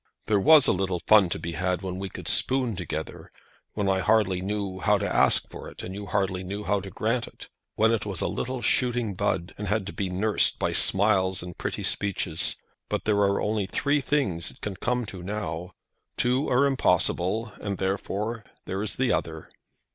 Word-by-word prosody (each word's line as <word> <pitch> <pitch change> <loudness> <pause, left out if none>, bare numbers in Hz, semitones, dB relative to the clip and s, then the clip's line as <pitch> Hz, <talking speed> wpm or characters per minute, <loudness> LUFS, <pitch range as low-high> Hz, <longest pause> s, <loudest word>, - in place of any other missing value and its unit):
There 105 -2 +2
was 150 +6 +7
a - - +4
little 95 -1 -1
fun 105 -4 +6
to - - -2
be 85 +1 -5
had 90 +1 -1
when 95 0 -4
we 95 0 -4
could - - -8
spoon 130 -4 +1
together, 80 -3 -6 0.4
when 105 -2 -1
I 95 0 +2
hardly 95 -2 +2
knew 100 -1 -3
how - - +3
to - - -2
ask - - +4
for - - -8
it, - - -11
and 95 - -6
you 100 +1 -7
hardly 95 0 -1
knew 100 +3 -5
how 100 +1 +1
to 95 0 -8
grant 115 +6 -1
it; - - -13 0.3
when 110 +1 +3
it 115 -3 0
was 100 -5 -4
a - - 0
little 130 -1 -3
shooting 120 -4 +1
bud, 90 0 -1
and 105 - -4
had 105 0 0
to 100 - -6
be 95 -2 -2
nursed 100 +4 +2
by - - -1
smiles 95 -2 +3
and 90 -1 -8
pretty - - -3
speeches. 95 -5 +1 0.3
But - - -2
there 105 -1 +2
are 100 -1 +2
only 105 -2 -1
three 145 +7 +1
things 115 - 0
it - - -17
can 100 -2 -4
come 125 +4 -1
to 95 -3 -8
now. 90 -3 -5 0.4
Two 125 +4 +1
are 130 +3 +4
impossible, 110 -3 +1
and 100 -2 -3
therefore 105 +4 -2 0.2
there 95 +2 -3
is 105 - -3
the 130 -2 +1
other." 80 -1 -3
100 Hz, 200 wpm, -26 LUFS, 95-110 Hz, 0.4 s, was